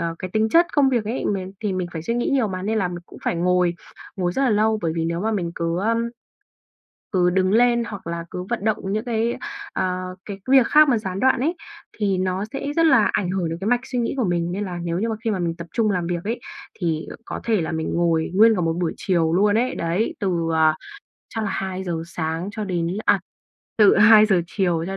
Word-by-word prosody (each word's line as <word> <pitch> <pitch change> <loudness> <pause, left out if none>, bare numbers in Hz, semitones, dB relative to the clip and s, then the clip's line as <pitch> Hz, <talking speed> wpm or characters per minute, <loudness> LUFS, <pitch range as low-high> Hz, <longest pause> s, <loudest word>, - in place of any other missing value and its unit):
c - - -34
cái 185 - -5
tính 220 0 +2
chất 335 +8 +5
công 280 -2 +4
việc 240 -5 0
ấy 230 +5 -3
mình 190 -2 -2
thì 205 -2 0
mình 185 -1 -2
phải 160 - -4
suy 200 +9 -2
nghĩ 240 - 0
nhiều 265 -5 +2
mà, 185 -2 -4
nên 215 +3 -1
là 190 -4 +1
mình 175 0 -6
cũng - - -14
phải - - 0
ngồi, 180 0 +2 0.4
ngồi 180 -2 -1
rất 270 - -1
là 260 - +3
lâu. 215 0 +2
Bởi 165 - 0
vì 165 -1 -1
nếu 170 +1 -2
mà 220 +2 0
mình 175 -5 -2
cứ, 170 +1 -1
ơ 225 +4 +1 1.2
cứ 180 -3 +3
đứng 185 +1 +1
lên, 235 +2 +4
hoặc 200 -6 -8
là 170 0 -4
cứ 180 - -4
vận 235 -4 -2
động 220 -1 +2 0.2
những 215 - -1
cái, 230 0 -1 0.4
ờ, 185 0 -2
cái 200 -2 -7
việc 265 -3 +6
khác 305 0 +6
mà 245 - +3
gián 190 -3 -4
đoạn 260 0 +3
ấy, 315 +7 0 0.4
thì 200 -3 +1
nó 185 +2 -1
sẽ 275 - -4
rất 330 - +4
là 265 -9 +5
ảnh 180 - -1
hưởng 185 -3 -1
đến 165 - -4
cái 195 - -2
mạch 245 +1 +3
suy 255 -2 -3
nghĩ 235 - -1
của 255 - +1
mình, 175 -3 0
nên 200 +3 -2
là 180 -3 -5
nếu 170 0 -2
như 225 +3 -1
mà 220 - -1
khi 225 - 0
mà 195 - -2
mình 170 -1 -1
tập 170 0 -8
trung 225 -3 +2
làm 180 -3 -1
việc 175 -1 -2
ấy, 230 +4 -3 0.4
thì 165 -4 -1 0.2
có - - -5
thể 220 -5 +1
là 160 - -3
mình 160 -1 -2
ngồi 165 -1 +1
nguyên 220 +3 +6
cả 180 - -1
một 165 -1 +1
buổi 165 - 0
chiều 165 -4 +1
luôn 205 +3 +3
ấy, 250 +2 0
đấy. 170 +7 -1
Từ, 175 -6 0
ờ, 160 -1 +4 0.6
chắc 225 -1 -1
là 200 - -2
2:00 185 -3 -3
sáng 165 +2 -3
cho 215 0 -4
đến 175 -4 -1 0.2
à, - - +4 0.6
từ 210 -2 +6
2:00 210 -3 +7
chiều, 175 -3 0
cho 195 +1 -4
190 Hz, 250 wpm, -22 LUFS, 175-220 Hz, 1.2 s, 2:00